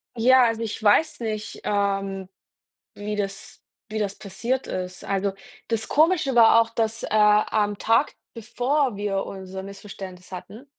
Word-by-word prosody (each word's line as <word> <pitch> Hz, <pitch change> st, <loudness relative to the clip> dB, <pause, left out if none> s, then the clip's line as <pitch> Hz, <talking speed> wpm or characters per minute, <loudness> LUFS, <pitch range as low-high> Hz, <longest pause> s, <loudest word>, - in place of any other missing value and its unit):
Ja, 255 Hz, +2 st, +6 dB
also 230 Hz, 0 st, 0 dB
ich 225 Hz, -1 st, -4 dB
weiß 265 Hz, +10 st, +3 dB
nicht, 215 Hz, -2 st, -4 dB
ähm, 195 Hz, -2 st, -1 dB, 0.7 s
wie 210 Hz, +1 st, -4 dB
das 195 Hz, -1 st, -5 dB, 0.3 s
wie 215 Hz, 0 st, -3 dB
das 200 Hz, -1 st, -2 dB
passiert 235 Hz, +7 st, -3 dB
ist. 180 Hz, -1 st, -5 dB
Also, 195 Hz, 0 st, -1 dB, 0.3 s
das 225 Hz, -1 st, -2 dB
Komische 310 Hz, -3 st, +3 dB
war 230 Hz, -1 st, +7 dB
auch, 230 Hz, -, -2 dB
dass, 225 Hz, 0 st, -1 dB
äh, -, -, -4 dB
am 210 Hz, -1 st, +3 dB
Tag, 225 Hz, +8 st, +2 dB, 0.2 s
bevor 245 Hz, +2 st, 0 dB
wir 200 Hz, -1 st, -2 dB
unser 190 Hz, 0 st, -7 dB
Missverständnis 195 Hz, -2 st, -10 dB
hatten, 205 Hz, +7 st, -9 dB
210 Hz, 145 wpm, -24 LUFS, 195-230 Hz, 0.7 s, war